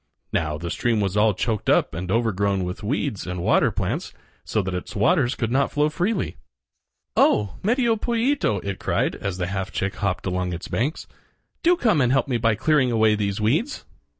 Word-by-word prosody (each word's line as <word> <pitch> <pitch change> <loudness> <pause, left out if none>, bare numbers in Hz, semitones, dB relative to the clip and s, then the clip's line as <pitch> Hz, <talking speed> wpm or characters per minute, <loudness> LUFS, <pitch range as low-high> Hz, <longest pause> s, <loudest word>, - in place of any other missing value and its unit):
Now, 75 -2 0
the 85 +1 -5
stream 120 -3 0
was 100 -2 -1
all 105 -1 +3
choked 110 +1 -1
up - - +3
and 90 +3 -5
overgrown 100 -3 +1
with 90 +2 -5
weeds 110 -1 -2
and 90 -1 -4
water - - +4
plants, - - -3 0.3
so 110 - -1
that 95 0 -3
its 90 - -5
waters 125 - +2
could 115 -2 -2
not 135 +2 +2
flow 150 +1 +2
freely. 185 +7 -1 0.8
"Oh! 105 -2 +3
Medio 235 +2 +2
Pollito," 235 - +1
it 100 -1 -3
cried - - 0
as 100 -3 -4
the 90 - -1
half 95 +1 -3
chick 95 +1 -2
hopped 100 -3 -2
along 90 -1 -1
its 85 - -6
banks, 140 +8 -2 0.6
"do 350 +1 +4
come 215 - +2
and 125 -1 +2
help 135 +1 +2
me 125 -3 0
by 115 -1 +2
clearing 140 +2 +2
away 110 -1 +4
these 100 -1 -1
weeds." 155 - 0
110 Hz, 190 wpm, -23 LUFS, 95-145 Hz, 0.8 s, water